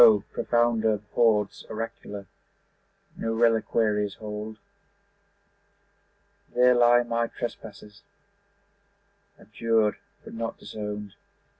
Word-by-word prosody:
profounder 115 Hz, -3 st, +2 dB
hoards 105 Hz, -4 st, +2 dB
oracular 105 Hz, -2 st, -6 dB, 0.9 s
No 115 Hz, 0 st, -2 dB
reliquaries 110 Hz, -3 st, +2 dB
hold. 105 Hz, 0 st, -6 dB, 2.0 s
There 125 Hz, 0 st, +6 dB
lie 120 Hz, 0 st, +5 dB
my 115 Hz, 0 st, -1 dB
trespasses, 105 Hz, -4 st, -8 dB, 1.4 s
Abjured 110 Hz, 0 st, +1 dB, 0.3 s
but -, -, -11 dB
not 115 Hz, 0 st, -4 dB
disowned. 105 Hz, -1 st, -6 dB
110 Hz, 70 wpm, -26 LUFS, 105-115 Hz, 2.0 s, There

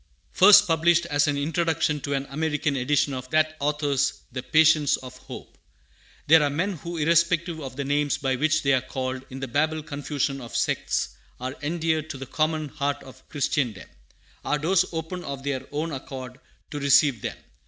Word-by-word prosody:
First 205 Hz, +2 st, +8 dB
published 170 Hz, 0 st, +3 dB
as 145 Hz, +1 st, +3 dB
an 145 Hz, -1 st, 0 dB
introduction 160 Hz, 0 st, 0 dB
to 140 Hz, 0 st, -2 dB
an 135 Hz, 0 st, -2 dB
American 150 Hz, -1 st, -1 dB
edition 140 Hz, +2 st, +1 dB
of 130 Hz, 0 st, -6 dB
that 155 Hz, +1 st, +2 dB
author's 145 Hz, -2 st, 0 dB
The 125 Hz, +1 st, -4 dB
Patience 155 Hz, 0 st, +4 dB
of 130 Hz, -1 st, -10 dB
Hope. 130 Hz, -, -11 dB, 0.7 s
THERE 160 Hz, +1 st, +7 dB
are 145 Hz, -, +2 dB
men 175 Hz, +8 st, -1 dB
who, 170 Hz, +2 st, -6 dB
irrespective 170 Hz, +1 st, +2 dB
of 130 Hz, -2 st, -7 dB
the 140 Hz, -, -3 dB
names 145 Hz, 0 st, 0 dB
by 135 Hz, -1 st, -1 dB
which 155 Hz, +3 st, +1 dB
they 140 Hz, 0 st, +3 dB
are 130 Hz, -, +3 dB
called 130 Hz, 0 st, -4 dB
in 130 Hz, +1 st, -8 dB
the 135 Hz, -, -3 dB
Babel 155 Hz, +5 st, 0 dB
confusion 140 Hz, -2 st, -3 dB
of 120 Hz, -, -9 dB
sects, -, -, 0 dB, 0.3 s
are 130 Hz, +2 st, -5 dB
endeared 160 Hz, 0 st, -1 dB
to 140 Hz, -, -5 dB
the 135 Hz, -, -7 dB
common 155 Hz, +2 st, -1 dB
heart 140 Hz, +1 st, -2 dB
of 130 Hz, -, -16 dB
Christendom. 130 Hz, -8 st, -1 dB, 0.6 s
Our 150 Hz, -, 0 dB
doors 170 Hz, +5 st, +2 dB
open 165 Hz, +2 st, -5 dB
of 140 Hz, -1 st, -6 dB
their 140 Hz, -2 st, -3 dB
own 155 Hz, +3 st, -2 dB
accord 130 Hz, -2 st, -7 dB, 0.3 s
to 145 Hz, -, -4 dB
receive 140 Hz, -4 st, +4 dB
them. -, -, -4 dB
145 Hz, 180 wpm, -25 LUFS, 135-160 Hz, 0.7 s, First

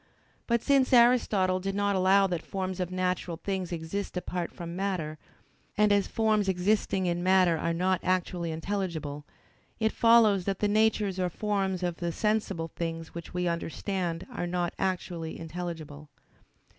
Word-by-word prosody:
But 235 Hz, -1 st, +1 dB
since 275 Hz, -2 st, +3 dB
Aristotle 225 Hz, -6 st, +4 dB
did 195 Hz, +1 st, -3 dB
not 200 Hz, 0 st, +1 dB
allow 190 Hz, +1 st, +4 dB
that 175 Hz, -4 st, -2 dB
forms 190 Hz, 0 st, -4 dB
of 180 Hz, -1 st, -1 dB
natural 185 Hz, -2 st, -2 dB
things 190 Hz, -2 st, -3 dB
exist 175 Hz, +4 st, -4 dB
apart 180 Hz, -1 st, -3 dB
from 170 Hz, 0 st, -7 dB
matter, 180 Hz, -6 st, -2 dB, 0.6 s
and 210 Hz, 0 st, +4 dB
as 200 Hz, -1 st, +2 dB
forms 215 Hz, -3 st, +1 dB
existing 190 Hz, +1 st, +1 dB
in 175 Hz, 0 st, 0 dB
matter 185 Hz, -2 st, +4 dB
are 165 Hz, +1 st, -1 dB
not 185 Hz, +2 st, +1 dB
actually 180 Hz, -2 st, -1 dB
intelligible; 160 Hz, -4 st, -3 dB, 0.5 s
it 220 Hz, -1 st, +2 dB
follows 225 Hz, -5 st, +5 dB
that 195 Hz, -2 st, -1 dB
the 210 Hz, -, +1 dB
natures 210 Hz, -2 st, +2 dB
or 180 Hz, -1 st, +1 dB
forms 195 Hz, -2 st, -1 dB
of 175 Hz, -2 st, -1 dB
the 170 Hz, -1 st, -2 dB
sensible 200 Hz, -4 st, -1 dB
things 165 Hz, -1 st, -4 dB
which 170 Hz, +1 st, -8 dB
we 180 Hz, 0 st, 0 dB
understand 170 Hz, +1 st, -2 dB
are 175 Hz, -, -3 dB
not 175 Hz, -1 st, -1 dB
actually 175 Hz, -3 st, -3 dB
intelligible. 160 Hz, -3 st, -6 dB
185 Hz, 155 wpm, -28 LUFS, 170-200 Hz, 0.6 s, follows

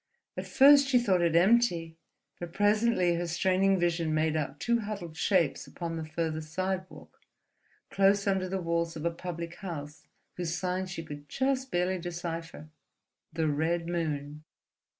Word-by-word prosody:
At -, -, -5 dB
first 280 Hz, 0 st, +6 dB
she 265 Hz, -2 st, +4 dB
thought 195 Hz, -7 st, +2 dB
it 170 Hz, -1 st, +2 dB
empty; 175 Hz, -4 st, +3 dB, 0.4 s
but 175 Hz, -1 st, -7 dB
presently 205 Hz, -3 st, +2 dB
her 170 Hz, +1 st, -2 dB
straining 190 Hz, +3 st, +2 dB
vision 165 Hz, -2 st, 0 dB
made 155 Hz, 0 st, +1 dB
out 145 Hz, -2 st, -3 dB
two 235 Hz, 0 st, +1 dB
huddled 200 Hz, -7 st, -6 dB
shapes 170 Hz, -5 st, +1 dB
upon 170 Hz, -1 st, -5 dB
the 160 Hz, -, -4 dB
farther 160 Hz, 0 st, -3 dB
sidewalk, 185 Hz, +4 st, -5 dB, 0.7 s
close 195 Hz, +1 st, +3 dB
under 190 Hz, -2 st, 0 dB
the 190 Hz, +1 st, -2 dB
walls 170 Hz, 0 st, -1 dB
of 155 Hz, 0 st, -6 dB
a 170 Hz, -, +2 dB
public 170 Hz, 0 st, -6 dB
house 150 Hz, -6 st, -7 dB, 0.3 s
whose 170 Hz, -2 st, -2 dB
sign 185 Hz, +1 st, -2 dB
she 175 Hz, -2 st, -6 dB
could 145 Hz, -2 st, -10 dB
just 265 Hz, -, -1 dB
barely 180 Hz, 0 st, 0 dB
decipher: 170 Hz, -2 st, -6 dB, 0.6 s
the 160 Hz, 0 st, -1 dB
Red 165 Hz, +3 st, 0 dB
Moon. 150 Hz, -3 st, -3 dB
175 Hz, 150 wpm, -29 LUFS, 160-190 Hz, 0.7 s, first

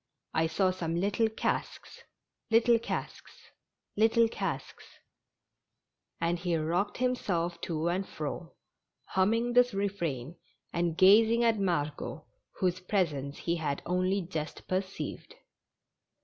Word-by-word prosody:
I 160 Hz, 0 st, +2 dB
saw 185 Hz, +3 st, +2 dB
some 170 Hz, -3 st, -3 dB
little 200 Hz, +5 st, +1 dB
casks 220 Hz, -, -3 dB, 0.3 s
— -, -, -57 dB
little 230 Hz, +1 st, +5 dB
casks -, -, -5 dB, 0.3 s
— -, -, -57 dB
little 225 Hz, +2 st, +4 dB
casks -, -, -4 dB, 0.7 s
" -, -, -56 dB
And 170 Hz, +1 st, 0 dB
he 175 Hz, -1 st, 0 dB
rocked 175 Hz, +6 st, -1 dB
himself 180 Hz, -9 st, -1 dB
to 165 Hz, -1 st, -2 dB
and 185 Hz, +3 st, -1 dB
fro, 155 Hz, +3 st, -5 dB, 0.5 s
humming 225 Hz, +6 st, +2 dB
this 245 Hz, -2 st, +4 dB
refrain, 170 Hz, -8 st, -2 dB, 0.4 s
and 170 Hz, -1 st, 0 dB
gazing 225 Hz, +5 st, +6 dB
at 225 Hz, -2 st, +3 dB
Margot, 155 Hz, -4 st, -2 dB, 0.3 s
whose 185 Hz, -1 st, +1 dB
presence 155 Hz, -8 st, -1 dB
he 170 Hz, 0 st, -1 dB
had 145 Hz, -3 st, -2 dB
only 185 Hz, +2 st, +1 dB
just 160 Hz, -3 st, -5 dB
perceived. 190 Hz, +1 st, -4 dB
185 Hz, 120 wpm, -30 LUFS, 165-210 Hz, 0.7 s, gazing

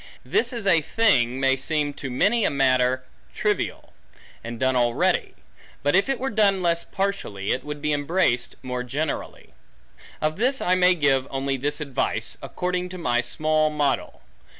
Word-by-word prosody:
This 240 Hz, +2 st, +1 dB
is 235 Hz, -4 st, -4 dB
a 170 Hz, -5 st, +5 dB
thing 135 Hz, -, +2 dB
may 135 Hz, 0 st, +3 dB
seem 145 Hz, +2 st, 0 dB
to 140 Hz, -, -6 dB
many 210 Hz, -, +2 dB
a -, -, +3 dB
matter 130 Hz, -2 st, +2 dB, 0.3 s
trivial, -, -, -2 dB, 0.5 s
and 115 Hz, 0 st, -6 dB
done 130 Hz, 0 st, +1 dB
already. 120 Hz, -1 st, +1 dB, 0.5 s
But 145 Hz, +4 st, +2 dB
if 195 Hz, +7 st, +3 dB
it 270 Hz, -, 0 dB
were 270 Hz, +1 st, -2 dB
done 200 Hz, -3 st, +2 dB
less 170 Hz, -1 st, +1 dB
partially, 190 Hz, -, -3 dB
it 130 Hz, -, -1 dB
would 150 Hz, 0 st, -7 dB
be 150 Hz, 0 st, +1 dB
embraced 145 Hz, -4 st, 0 dB
more 125 Hz, -1 st, -3 dB
generally. 140 Hz, +5 st, -4 dB, 0.7 s
Of 155 Hz, 0 st, -1 dB
this 260 Hz, +5 st, +1 dB
I 180 Hz, -, +1 dB
may 180 Hz, 0 st, +4 dB
give 135 Hz, -4 st, +2 dB
only 135 Hz, 0 st, -2 dB
this 145 Hz, +3 st, -2 dB
advice, 140 Hz, -4 st, -2 dB
according 180 Hz, 0 st, -3 dB
to 185 Hz, -, -7 dB
my 120 Hz, -8 st, +1 dB
small 155 Hz, +5 st, +1 dB
model. 145 Hz, -, -1 dB
150 Hz, 165 wpm, -24 LUFS, 130-180 Hz, 0.7 s, a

